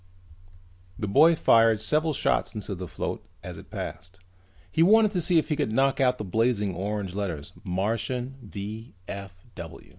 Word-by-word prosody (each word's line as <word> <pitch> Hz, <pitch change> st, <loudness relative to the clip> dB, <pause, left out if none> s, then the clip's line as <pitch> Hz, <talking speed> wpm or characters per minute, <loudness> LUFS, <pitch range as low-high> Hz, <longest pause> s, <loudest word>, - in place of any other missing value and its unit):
The 105 Hz, -, -3 dB
boy 160 Hz, +12 st, +6 dB
fired 115 Hz, -6 st, +5 dB
several 155 Hz, +7 st, +1 dB
shots 130 Hz, -, 0 dB
into 105 Hz, -1 st, -4 dB
the 90 Hz, -1 st, -6 dB
float -, -, -4 dB, 0.2 s
as -, -, -7 dB
it -, -, -14 dB
passed. 90 Hz, +1 st, -7 dB, 0.5 s
He 160 Hz, -, +1 dB
wanted 215 Hz, +4 st, +6 dB
to 180 Hz, -4 st, 0 dB
see 170 Hz, +1 st, +2 dB
if 160 Hz, -, +2 dB
he 150 Hz, -, +1 dB
could 145 Hz, -7 st, -1 dB
knock 135 Hz, +4 st, +2 dB
out 125 Hz, -1 st, +3 dB
those 105 Hz, -, -5 dB
blazing 110 Hz, -2 st, +1 dB
orange 100 Hz, +1 st, -3 dB
letters: 90 Hz, -5 st, -4 dB
MARTIAN 115 Hz, +7 st, -2 dB
V. 105 Hz, +1 st, -7 dB
110 Hz, 155 wpm, -26 LUFS, 100-135 Hz, 0.5 s, boy